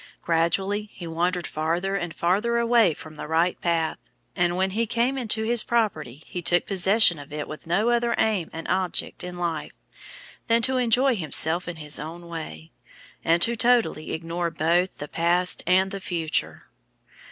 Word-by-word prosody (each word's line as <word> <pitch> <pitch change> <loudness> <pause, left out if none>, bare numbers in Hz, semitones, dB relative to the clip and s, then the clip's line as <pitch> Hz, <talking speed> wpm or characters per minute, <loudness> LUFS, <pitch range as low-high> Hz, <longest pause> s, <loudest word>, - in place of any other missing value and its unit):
Gradually 190 +5 0
he 175 - -9
wandered 175 +2 -1
farther 170 +5 -1
and 175 -3 -3
farther 205 +9 +1
away 235 -7 +4
from 155 -1 -12
the 150 - -6
right 165 +3 +1
path, 165 -2 0 0.4
and 175 0 +1
when 190 +1 +1
he 225 +3 0
came 240 +5 +1
into 220 -4 -2
his 230 0 +2
property 160 - -1
he 180 - -6
took 175 +1 +2
possession 195 -2 +4
of 145 +1 -11
it 150 0 -4
with 155 +1 -9
no 200 +7 +2
other 235 0 +1
aim 210 -6 +1
and 165 0 -7
object 185 0 -1
in 180 0 -6
life 170 -3 -3 0.7
than 230 0 +3
to 260 +1 +2
enjoy 250 +2 +3
himself 165 0 0
in 175 - -4
his 150 -2 -5
own 170 +3 -8
way 155 - -8 0.5
and 170 +1 +3
to 235 +4 +1
totally 235 -9 +2
ignore 170 +1 -2
both 170 +3 +1
the 145 - -6
past 175 +3 +1
and 190 +2 +2
future. 165 -4 -2
175 Hz, 165 wpm, -25 LUFS, 165-215 Hz, 0.7 s, away